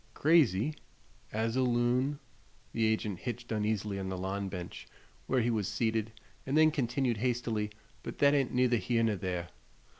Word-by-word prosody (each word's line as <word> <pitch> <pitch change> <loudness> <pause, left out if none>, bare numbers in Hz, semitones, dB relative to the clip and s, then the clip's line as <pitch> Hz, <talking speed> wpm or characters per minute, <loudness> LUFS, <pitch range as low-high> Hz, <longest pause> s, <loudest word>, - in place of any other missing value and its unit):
"Crazy?" 150 - +4 0.6
"As 115 +2 -1
a 130 - +2
loon." 125 +3 +2 0.6
The 115 -1 +2
agent 110 -4 -1
hitched 120 -1 -5
uneasily 105 -2 -1
on 95 -1 -3
the 95 - -3
lawn 95 +2 -3
bench, 90 -2 -7 0.4
where 130 -1 +2
he 120 +1 +1
was 105 -4 0
seated, 110 -1 -1 0.3
and 135 +3 0
then 155 0 +6
continued, 125 -3 0
hastily: 115 -2 -1 0.3
"But - - -7
thet 140 0 +5
ain't 135 -3 +2
neither 125 -1 +3
here 115 +1 +1
ner 110 -2 +2
there. 90 -2 -3
115 Hz, 160 wpm, -31 LUFS, 105-125 Hz, 0.6 s, then